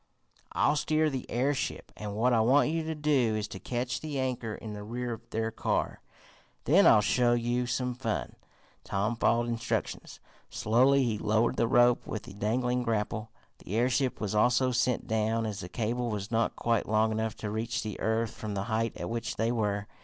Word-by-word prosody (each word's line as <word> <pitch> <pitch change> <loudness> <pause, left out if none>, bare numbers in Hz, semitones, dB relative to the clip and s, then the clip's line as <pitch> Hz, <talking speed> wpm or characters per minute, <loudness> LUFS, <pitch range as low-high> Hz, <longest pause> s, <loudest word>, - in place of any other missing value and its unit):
I'll 150 - +3
steer 155 +1 +1
the 130 -2 -5
airship, 130 +3 -1
and 105 -1 -6
what 120 +3 +2
I 115 - +4
want 135 +6 +4
you 165 0 0
to 160 0 -3
do 140 -7 +2
is 105 0 -3
to 95 - -7
catch 125 +3 -3
the 150 -3 -4
anchor 125 -4 -2
in 110 -2 -8
the 105 - -7
rear 120 +3 -4
of 115 +1 -11
their 110 0 -2
car. - - -1 0.6
Then 185 +8 +5
I'll 110 - +7
show 120 +2 +3
you 120 +1 0
some 125 0 -1
fun." 120 -3 -3 0.5
Tom 100 +4 -1
followed 120 +1 +2
instructions. 115 -1 -3 0.3
Slowly 130 +5 +3
he 110 -4 -1
lowered 110 +2 +1
the 115 - +2
rope 120 0 +4
with 110 - -4
the - - -11
dangling 125 +5 0
grapple. 110 -1 -2 0.3
The 100 - -6
airship 125 +3 +1
was 105 -2 -2
also 125 +4 +3
sent 125 0 +1
down, 110 +1 0
as 105 -3 -4
the 90 - -7
cable 120 +4 -2
was 105 -1 -4
not 115 0 +1
quite 115 -3 0
long 110 +1 +3
enough 110 0 -2
to 105 - -5
reach 115 +2 -2
the 105 -1 -5
earth 110 0 0
from 105 -2 -6
the 100 - -1
height 115 +1 0
at - - -4
which 115 0 -3
they 115 +1 0
were. 105 -3 -1
115 Hz, 195 wpm, -29 LUFS, 110-125 Hz, 0.6 s, I'll